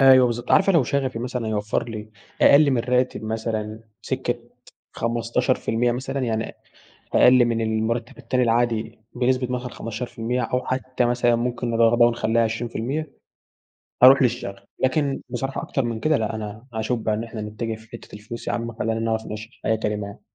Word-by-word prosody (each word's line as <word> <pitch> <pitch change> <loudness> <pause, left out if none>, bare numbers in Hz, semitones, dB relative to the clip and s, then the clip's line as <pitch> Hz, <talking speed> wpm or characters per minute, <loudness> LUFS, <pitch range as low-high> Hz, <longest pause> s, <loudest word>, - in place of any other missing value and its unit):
أيوه، 130 -1 +8
بالضبط 120 0 -3
عارفة 195 0 +5
لو 165 -5 +5
شغفي 130 -2 -1
مثلًا 125 -1 -3
هيوفر 105 +2 -1
لي 110 -1 -7 0.3
أقل 145 0 +7
من 130 - +2
الراتب 125 -1 0
مثلًا، 110 -1 -3 0.2
سِكة - - -1 0.6
15% 120 +1 0
مثلًا، 135 +3 -3
يعني 115 -3 -1
أ - - -11 0.6
أقل 125 0 +7
من 115 -1 0
المرتب 110 +2 -1
التاني 130 -1 0
العادي 115 -2 0
بنسبة 125 0 +1
مثلًا 125 0 -3
15% 115 +2 -3
أو 125 +2 -1
حتى 130 -1 -1
مثلًا 120 0 +2
ممكن 120 0 -2
نر 115 0 +4
قربها 120 0 +5
ونخلّيها 115 0 +1
20%، 120 +6 -2 0.9
هاروح 135 +2 +9
للشغف، 115 -5 -1 0.2
لكن 135 +1 +1
بصراحة 135 +2 -3
أكتر 135 - -1
من 115 -1 -3
كده 155 +4 +2
لأ، 110 -1 -2
أنا 110 +2 -7
هاشوف 110 +2 -1
بقي 110 -1 0
إن 110 - -3
إحنا 115 -1 -6
نتجه 110 +2 -4
في 110 0 -16
حتة 115 - -10
الفلوس 105 +3 -8
يا - - 0
عم 115 0 -3
خلينا 115 0 -1
نعرف 110 0 -1
نعيش 110 +2 -8
حياة 110 - +2
كريمة 105 -2 -2
يعني. 100 - -11
115 Hz, 170 wpm, -23 LUFS, 110-125 Hz, 0.9 s, هاروح